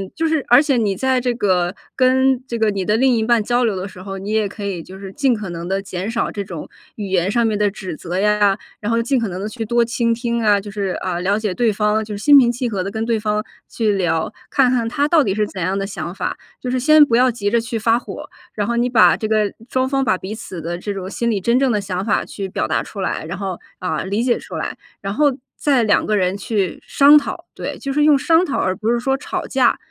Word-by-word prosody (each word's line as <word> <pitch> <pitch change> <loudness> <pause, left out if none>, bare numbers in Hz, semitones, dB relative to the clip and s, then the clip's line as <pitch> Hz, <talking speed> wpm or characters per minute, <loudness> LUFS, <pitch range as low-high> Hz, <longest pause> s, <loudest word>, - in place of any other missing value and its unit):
就 325 - -1
是， 315 -3 0
而 245 +4 +6
且 280 -4 +1
你 210 -4 +1
在 260 +3 +1
这 250 0 0
个 185 -5 0 0.2
跟 260 0 +3
这 235 - -3
个 220 -1 +2
你 195 -2 -3
的 210 - +2
另 255 +2 +3
一 - - +1
半 230 0 +2
交 245 +3 +1
流 215 -4 0
的 185 0 -4
时 185 -2 -10
候， 195 0 -6
你 195 +2 -5
也 215 -1 +1
可 205 +1 -9
以 195 -4 -3
就 185 +3 -11
是 195 -1 -8
尽 265 +5 +1
可 210 -4 -6
能 170 0 -6
的 195 +1 -1
减 190 +1 -5
少 230 0 -1
这 205 - -4
种 175 -5 -7 0.3
语 205 -2 -5
言 185 -1 +1
上 235 +3 +2
面 215 -2 0
的 210 -1 +3
指 190 -5 -7
责 180 +1 -4
呀， 205 0 +3 0.2
然 210 - -3
后 230 0 +2
尽 255 +3 +1
可 230 - -1
能 185 0 -5
地 210 - -3
去 225 0 -5
多 235 +2 +2
倾 230 0 0
听 235 0 -2
啊， 210 -2 +4
就 200 +1 -6
是， 200 -2 -2
呃， 180 -2 -2
了 195 +3 +1
解 215 -3 -2
对 230 +1 +1
方， 210 +1 +1
就 210 -1 -6
是 205 - -7
心 290 -1 +8
平 245 -3 +6
气 240 +1 -2
和 200 -4 -2
地 190 - -3
跟 220 +2 -3
对 230 -1 0
方 210 0 -1 0.2
去 220 -3 0
聊， 175 -4 0 0.2
看 265 -3 +3
看 235 -3 +1
他 285 +4 0
到 315 +1 +4
底 195 -8 0
是 210 0 +1
怎 195 -2 -7
样 185 +3 0
的 195 - -2
想 190 -3 -6
法， - - -3 0.2
就 250 - -3
是 255 - 0
先 305 +3 +6
不 235 -4 +2
要 255 +1 +4
急 210 -4 -2
着 235 - +2
去 230 0 -4
发 225 +2 +2
火， - - -9 0.2
然 205 - -1
后 235 +3 -1
你 240 +1 +2
把 240 -2 +5
这 215 - -3
个， 215 -2 +1 0.2
双 260 0 0
方 275 0 +1
把 220 - +2
彼 190 +3 -6
此 190 -6 -7
的 170 +2 -4
这 205 +3 -4
种 190 -1 -6
心 235 +3 -1
里 205 -4 0
真 235 +6 +2
正 265 -3 +2
的 210 - 0
想 190 -1 -3
法 215 - +1
去 195 -2 -6
表 185 - -2
达 - - +1
出 200 - -7
来， 185 - -2
然 175 +4 -5
后， 190 -3 -4 0.2
呃， 170 -3 -2
理 200 +4 -1
解 245 -1 +1
出 - - -9
来， - - -4 0.2
然 195 0 -3
后 285 +1 +2 0.2
再 275 -5 +2
两 210 -2 +3
个 215 - +1
人 185 -1 +1
去 200 -3 -2
商 285 +1 +6
讨， - - -6
对， - - -5
就 275 -1 -4
是 295 +1 +2
用 300 -1 +6
商 325 +5 +3
讨 285 - -2
而 185 0 0
不 220 +2 -1
是 240 - +1
说 270 +2 0
吵 275 - -4
架。 255 -3 +2
215 Hz, 295 characters per minute, -19 LUFS, 195-245 Hz, 0.3 s, 心